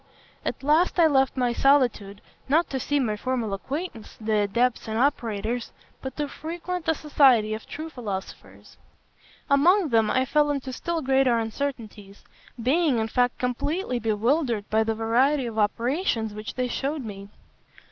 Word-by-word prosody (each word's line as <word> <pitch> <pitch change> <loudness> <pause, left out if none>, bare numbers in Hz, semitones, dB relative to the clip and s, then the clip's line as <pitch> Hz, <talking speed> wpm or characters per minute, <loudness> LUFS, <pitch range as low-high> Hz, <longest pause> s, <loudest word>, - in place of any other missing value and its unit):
"At - - -4
last 310 +7 +3
I 335 - +7
left 270 -3 +2
my 245 -2 +1
solitude, 240 -7 +2 0.3
not 320 +5 +3
to 265 - -1
see 290 +3 0
my 225 -6 0
former 235 -2 -2
acquaintances, 265 - -6
the 215 -1 0
adepts 235 +5 0
and 220 0 -2
operators, 235 -3 -1 0.3
but 265 -1 -7
to 295 -1 -1
frequent 340 +4 -5
the 320 - +3
society 260 -8 +3
of 215 - -7
true 315 +2 -6
philosophers. 205 -8 -8 0.7
Among 330 +5 +4
them 225 -3 +3
I 260 +3 +2
fell 295 +2 +2
into 275 -2 -3
still 335 +4 -3
greater 265 -2 +3
uncertainties; 225 -4 -5 0.4
being, 275 +3 +2
in 220 0 -1
fact, 245 +1 +1
completely 250 +3 -2
bewildered 230 +1 0
by 220 +1 +3
the 225 0 -1
variety 250 +5 +2
of 225 -2 -4
operations 230 - 0
which 215 +1 -7
they 255 -1 -1
shewed 275 +2 -3
me. 200 -2 -8
250 Hz, 155 wpm, -25 LUFS, 220-290 Hz, 0.7 s, I